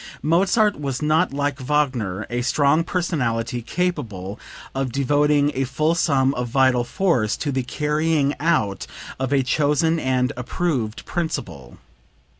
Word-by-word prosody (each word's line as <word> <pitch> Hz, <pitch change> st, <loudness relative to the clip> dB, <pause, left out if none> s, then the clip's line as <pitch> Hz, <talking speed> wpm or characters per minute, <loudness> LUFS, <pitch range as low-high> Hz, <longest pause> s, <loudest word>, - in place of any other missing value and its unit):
Mozart 190 Hz, +4 st, +2 dB
was 135 Hz, 0 st, -3 dB
not 155 Hz, +4 st, +2 dB
like 145 Hz, 0 st, -2 dB
Wagner, 125 Hz, -8 st, -1 dB
a 120 Hz, 0 st, -1 dB
strong 140 Hz, +5 st, +2 dB
personality 125 Hz, -10 st, -1 dB
capable 115 Hz, -, -3 dB, 0.3 s
of 135 Hz, -2 st, -2 dB
devoting 145 Hz, +2 st, +2 dB
a 135 Hz, -, 0 dB
full 155 Hz, +5 st, 0 dB
sum 140 Hz, -5 st, +2 dB
of 125 Hz, -1 st, -3 dB
vital 130 Hz, 0 st, +3 dB
force 125 Hz, -, 0 dB
to 145 Hz, -, -2 dB
the 130 Hz, -1 st, 0 dB
carrying 150 Hz, +2 st, 0 dB
out 145 Hz, -, 0 dB, 0.3 s
of 130 Hz, 0 st, -2 dB
a 140 Hz, -2 st, +3 dB
chosen 150 Hz, +5 st, +1 dB
and 130 Hz, -2 st, 0 dB
approved 125 Hz, -3 st, -2 dB
principle. 155 Hz, -, -4 dB
140 Hz, 130 wpm, -22 LUFS, 125-155 Hz, 0.3 s, vital